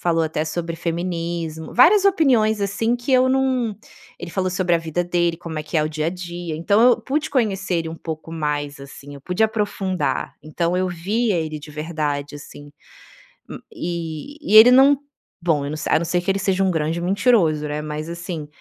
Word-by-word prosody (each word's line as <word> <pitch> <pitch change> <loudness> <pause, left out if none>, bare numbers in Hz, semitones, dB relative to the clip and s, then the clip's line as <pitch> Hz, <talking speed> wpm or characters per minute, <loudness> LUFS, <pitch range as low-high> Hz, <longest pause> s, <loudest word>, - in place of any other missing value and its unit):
falou 165 -1 +1
até 155 0 -2
sobre 165 +1 -4
feminismo 170 -1 -4
várias 385 - +6
opiniões, 250 - +3
assim, 205 +4 0
que 245 +3 -6
eu 255 0 +5
não 260 -4 +1 0.4
ele 175 - -7
falou 185 0 -1
sobre 180 -2 +1
a - - -2
vida 165 +1 -2
dele, 175 -1 +1
como 160 -2 -6
é - - -3
que 155 - -3
é 150 - +2
o 155 - -1
dia 155 0 -3
a - - +1
dia, 175 -2 -6
então 200 +6 +2
eu 245 -1 +5
pude 305 +3 -2
conhecer 200 -7 0
ele 165 -1 -2
um 160 - -6
pouco 160 0 -7
mais, 145 -2 -3
assim, 140 +1 -11
eu 140 - -11
pude 180 +6 -1
aprofundar. 205 -4 -2
Então 170 +3 -1
eu 185 0 0
via 195 +4 -1
ele 155 -2 -3
de 150 - -11
verdade, 150 -2 -3
assim. 145 0 -12 0.8
Hum - - -7
e 170 - -5 0.2
e 215 - +10
ele 240 +3 +10
não 270 +2 +6 0.4
bom, 160 -4 +1
eu 140 - -4
não 155 - -4
se 155 - -5
a - - +4
não 170 - -3
ser 175 +1 0
que 195 +2 0
ele 195 - -1
seja 195 0 +1
um 190 - +2
grande 160 +1 -1
mentiroso, 180 -6 +2
né, 150 +1 -3
mas 150 +1 -5
assim, 170 -3 -6
175 Hz, 205 wpm, -21 LUFS, 155-205 Hz, 0.8 s, e